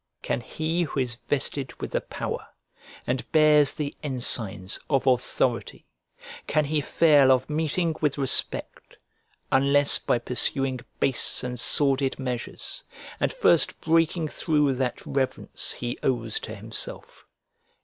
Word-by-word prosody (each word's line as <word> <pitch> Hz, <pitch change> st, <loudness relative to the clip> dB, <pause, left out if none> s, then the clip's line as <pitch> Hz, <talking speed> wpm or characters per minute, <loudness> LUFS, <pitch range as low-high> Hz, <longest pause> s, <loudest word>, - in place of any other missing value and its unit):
Can -, -, -1 dB
he 160 Hz, +7 st, -2 dB
who 150 Hz, -4 st, -2 dB
is 125 Hz, -2 st, 0 dB
vested 140 Hz, -1 st, -2 dB
with -, -, -5 dB
the -, -, 0 dB
power -, -, -5 dB, 0.6 s
and 125 Hz, +1 st, -3 dB
bears 150 Hz, -2 st, +5 dB
the 145 Hz, -2 st, -4 dB
ensigns 115 Hz, -, -1 dB
of 135 Hz, -4 st, +1 dB
authority, 130 Hz, -2 st, 0 dB, 0.6 s
can 155 Hz, 0 st, +2 dB
he 150 Hz, +1 st, 0 dB
fail 145 Hz, -3 st, +5 dB
of 130 Hz, +3 st, +1 dB
meeting 160 Hz, +2 st, 0 dB
with 150 Hz, -2 st, +1 dB
respect, 135 Hz, -2 st, -2 dB, 0.5 s
unless 140 Hz, +1 st, +4 dB
by -, -, +1 dB
pursuing 130 Hz, +2 st, 0 dB, 0.2 s
base 130 Hz, -1 st, +2 dB
and 125 Hz, -1 st, -4 dB
sordid 135 Hz, 0 st, +1 dB
measures, 130 Hz, -, -5 dB, 0.4 s
and -, -, +1 dB
first -, -, +3 dB
breaking 165 Hz, 0 st, +1 dB
through 150 Hz, -4 st, +1 dB
that 130 Hz, -1 st, -3 dB
reverence 135 Hz, -1 st, -1 dB
he 120 Hz, 0 st, -5 dB
owes 115 Hz, -4 st, 0 dB
to 110 Hz, -, -7 dB
himself? 110 Hz, +1 st, -3 dB
135 Hz, 130 wpm, -25 LUFS, 125-150 Hz, 0.6 s, bears